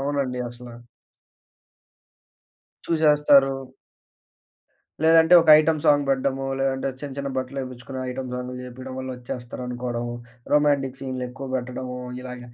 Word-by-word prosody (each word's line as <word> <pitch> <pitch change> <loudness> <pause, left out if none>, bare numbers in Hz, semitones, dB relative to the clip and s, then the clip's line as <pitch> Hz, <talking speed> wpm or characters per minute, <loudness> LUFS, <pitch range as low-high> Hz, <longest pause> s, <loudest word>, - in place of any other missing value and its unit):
అవునండి. 135 -3 -1
అసల. 120 0 -11 2.0
చూసేస్తారు. 150 -4 +4 1.5
లేదంటే 165 +2 +6
ఒక 165 - -3
ఐటెమ్ 155 0 +2
సాంగ్ 145 -1 +4
పెడ్డము, 135 0 0
లేదంటే 135 0 0
చిన్న 145 -2 -6
చిన్న 140 0 -3
బట్టలేపిచ్చుకునే 130 0 -5
ఐటెమ్ 130 0 -5
సాంగులు 125 0 -5
జేపియడం 130 +1 -8
వల్ల 130 0 -5
ఒచ్చేస్తారనుకోవడం, 125 0 -5 0.5
రొమాంటిక్ 140 -3 +2
సీన్లేక్కువ 130 0 -5
పెట్టడము, 125 0 -5 0.2
ఇలాగ 125 -1 -8
130 Hz, 100 wpm, -24 LUFS, 125-140 Hz, 2.0 s, లేదంటే